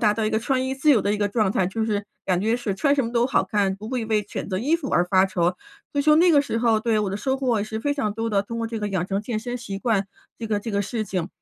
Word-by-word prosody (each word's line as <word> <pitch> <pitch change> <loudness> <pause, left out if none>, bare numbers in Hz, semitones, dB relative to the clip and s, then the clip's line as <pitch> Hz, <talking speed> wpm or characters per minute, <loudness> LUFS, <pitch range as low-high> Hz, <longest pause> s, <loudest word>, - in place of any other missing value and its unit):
达 210 -2 +4
到 220 0 -2
一 - - +2
个 220 - +1
穿 260 +2 0
衣 265 - -2
自 295 +3 +3
由 240 - +5
的 200 +1 0
一 - - -1
个 205 0 0
状 210 -2 +1
态， 185 - +1
就 220 +3 -2
是 205 -2 -1 0.2
感 180 -1 +1
觉 225 +3 +1
是 215 -5 -3
穿 280 +8 +2
什 275 - +1
么 230 - -4
都 235 0 +3
好 265 - +2
看， 200 -3 0
不 215 +2 -8
会 250 -3 -2
为 215 -1 +1
选 - - -5
择 185 -1 -1
衣 290 +9 +1
服 285 -6 -6
而 175 - +3
发 185 +1 +4
愁， 180 -2 0 0.4
所 285 - +1
以 - - 0
说 300 +1 +5
那 350 +2 +5
个 285 -1 +5
时 230 - -2
候， 230 -2 +3
对， 220 -1 +1
我 210 - 0
的 195 - -3
收 265 +6 -1
获 255 -4 +1
也 205 - -1
是 220 0 -5
非 285 +5 -1
常 240 -8 -1
多 225 +1 -3
的， 200 -2 +1
通 230 +3 -6
过 230 - -1
这 225 -1 -4
个 210 - -2
养 185 -2 -1
成 195 +1 -1
健 220 0 -3
身 245 +2 -4
习 200 -5 -6
惯 205 -4 0 0.3
这 225 - -5
个 210 - +1
这 225 +2 -5
个 200 0 +1
事 215 +2 -3
情。 185 -2 -3
220 Hz, 355 characters per minute, -24 LUFS, 200-245 Hz, 0.4 s, 由